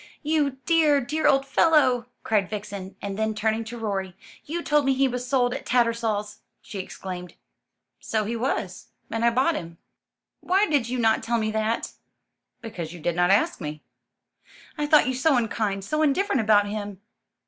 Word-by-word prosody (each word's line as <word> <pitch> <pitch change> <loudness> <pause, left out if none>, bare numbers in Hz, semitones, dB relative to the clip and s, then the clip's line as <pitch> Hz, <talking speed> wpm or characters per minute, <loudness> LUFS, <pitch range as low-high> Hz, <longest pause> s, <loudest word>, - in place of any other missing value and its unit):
"You 295 -3 +1
dear, 310 -3 +4
dear 300 +5 0
old 275 -1 +4
fellow!" 270 -4 +3 0.2
cried 205 -4 +1
Vixen; 200 -2 -6
and 200 0 -4
then 220 0 0
turning 220 +1 0
to 235 +2 -7
Rorie: 195 -5 -3 0.3
"You 340 +3 -4
told 295 0 +2
me 270 -1 +2
he 270 +1 +3
was 250 0 -4
sold 250 -2 +2
at - - -5
Tattersall's!" 230 -3 0 0.2
she 200 - -8
exclaimed. 180 -1 -7 0.6
"So 220 -1 -1
he 225 +3 -3
was, 250 +4 -3 0.2
and 225 0 -2
I 235 - +5
bought 260 +8 +2
him." 170 - -6 0.6
"Why 385 +3 +2
did 285 - 0
you 255 - -2
not 225 -2 +2
tell 235 +1 0
me 215 -1 -1
that?" 220 +1 -1 0.7
"Because 175 -8 -6
you 175 - -10
did 170 +1 -1
not 175 0 +2
ask 195 -1 +2
me." 150 -1 -6 0.9
"I 295 -1 -2
thought 300 -3 +5
you 260 - 0
so 265 +2 +2
unkind, 215 -4 -1
so 305 +8 -1
indifferent 295 - +2
about 210 -1 +4
him." 205 -2 -5
230 Hz, 175 wpm, -25 LUFS, 205-270 Hz, 0.9 s, I